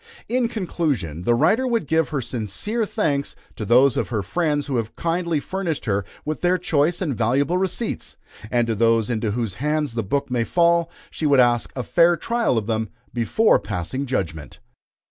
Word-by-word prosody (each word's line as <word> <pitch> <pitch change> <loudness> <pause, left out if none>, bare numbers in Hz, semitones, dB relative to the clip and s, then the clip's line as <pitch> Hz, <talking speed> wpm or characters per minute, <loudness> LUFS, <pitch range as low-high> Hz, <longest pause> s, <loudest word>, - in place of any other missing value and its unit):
In 245 0 +1
conclusion, 145 - -2
the 120 - +4
writer 215 - +3
would 230 -8 0
give 160 +1 +1
her 145 -4 -2
sincere 130 - -2
thanks 145 -11 -1 0.2
to 110 - -5
those 125 +4 +5
of - - -1
her 110 -4 -1
friends 150 - 0
who 135 -3 -1
have 115 0 -3
kindly 170 -1 -1
furnished 175 -1 -3
her 100 -3 0 0.2
with 155 0 -3
their 180 +1 +3
choice 170 +1 +1
and 145 -7 -1
valuable 135 +10 +1
receipts: 190 +4 -2 0.3
and 120 0 +2
to 115 - -1
those 115 +1 +2
into 110 -1 -1
whose 110 -2 -2
hands 150 -3 0
the 115 - -1
book 130 +6 -2
may 120 -2 +1
fall 170 +3 +2 0.2
she 155 - -2
would 140 -2 +4
ask 120 -1 +3
a 125 - -3
fair 170 - +4
trial 230 - 0
of 110 - -1
them 110 -1 -1 0.2
before 125 - +3
passing 100 +8 -4
judgment. 80 - -3
140 Hz, 185 wpm, -22 LUFS, 115-170 Hz, 0.3 s, those